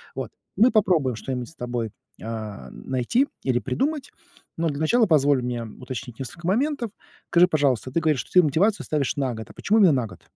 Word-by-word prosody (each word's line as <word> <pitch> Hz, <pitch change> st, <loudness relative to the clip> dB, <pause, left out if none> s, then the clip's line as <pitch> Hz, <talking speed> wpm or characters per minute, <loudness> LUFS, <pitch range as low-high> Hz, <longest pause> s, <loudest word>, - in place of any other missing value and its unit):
Вот -, -, -4 dB, 0.3 s
мы 235 Hz, +4 st, +6 dB
попробуем 170 Hz, -, +2 dB
что-нибудь 125 Hz, +1 st, -4 dB
с 160 Hz, -, -17 dB
тобой, 120 Hz, -4 st, -3 dB, 0.3 s
а, 110 Hz, -2 st, -6 dB
найти 130 Hz, -, 0 dB, 0.2 s
или 125 Hz, -2 st, +1 dB
придумать, 280 Hz, -, -2 dB, 0.5 s
но 165 Hz, 0 st, 0 dB
для 140 Hz, 0 st, -4 dB
начала 225 Hz, +9 st, +3 dB
позволь 145 Hz, -4 st, +4 dB
мне 120 Hz, -1 st, -3 dB
уточнить 125 Hz, +2 st, -8 dB
несколько 170 Hz, +6 st, -7 dB
моментов. 240 Hz, +3 st, 0 dB, 0.4 s
Скажи, 175 Hz, +1 st, +5 dB
пожалуйста, 140 Hz, -7 st, +1 dB
ты 165 Hz, -, +1 dB
говоришь, 155 Hz, -5 st, +1 dB
что -, -, -7 dB
ты 180 Hz, -1 st, +6 dB
мотивацию 190 Hz, +9 st, +2 dB
ставишь 145 Hz, -3 st, 0 dB
на 135 Hz, -4 st, -1 dB
год. 110 Hz, 0 st, -8 dB
А -, -, -12 dB
почему 220 Hz, +2 st, +2 dB
именно 180 Hz, -7 st, +6 dB
на 125 Hz, -3 st, +1 dB
год? -, -, -14 dB
145 Hz, 190 wpm, -24 LUFS, 125-185 Hz, 0.5 s, мы